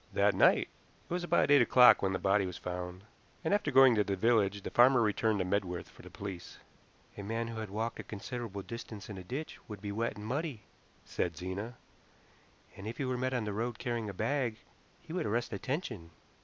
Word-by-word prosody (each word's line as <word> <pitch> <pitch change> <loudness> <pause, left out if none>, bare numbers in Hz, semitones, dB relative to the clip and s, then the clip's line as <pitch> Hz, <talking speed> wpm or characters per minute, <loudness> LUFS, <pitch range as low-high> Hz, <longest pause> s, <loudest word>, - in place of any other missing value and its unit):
"That - - +3
night. - - +4 0.4
It - - -5
was 180 0 -1
about 175 - +2
eight 145 -2 +8
o'clock 125 +1 +7
when 95 - +1
the 95 - 0
body 100 0 +2
was 90 - -6
found, 90 +1 -6 0.4
and 160 - +1
after 205 -7 +1
going 135 -2 +7
to 105 -2 +3
the 100 -1 -1
village 100 -1 +2
the - - -5
farmer 125 +1 +6
returned 110 -1 +2
to 95 - 0
Medworth 90 -2 -2
for - - -16
the - - -12
police." 95 -3 -7 0.6
"A - - -3
man 115 +3 -3
who 115 -1 -5
had 110 -2 -5
walked 115 +3 -3
a - - -4
considerable 105 -1 -6
distance 110 -3 -8
in 100 - -7
a - - -8
ditch 135 - -6
would 105 -2 -7
be 100 0 -5
wet 115 +3 -2
and 105 - -8
muddy," 135 -1 -3 0.4
said 85 -2 -2
Zena, 95 +6 -5 1.0
"and 100 - -8
if 115 +2 -5
he 140 - -2
were 130 0 -1
met 130 +1 -1
on 120 - 0
the 105 - -3
road 115 +3 -2
carrying 120 -4 -3
a - - -3
bag 125 -2 -1 0.5
he 160 - -9
would 180 -7 -1
arrest 115 +2 -1
attention." 120 - -4
110 Hz, 215 wpm, -32 LUFS, 100-125 Hz, 1.0 s, eight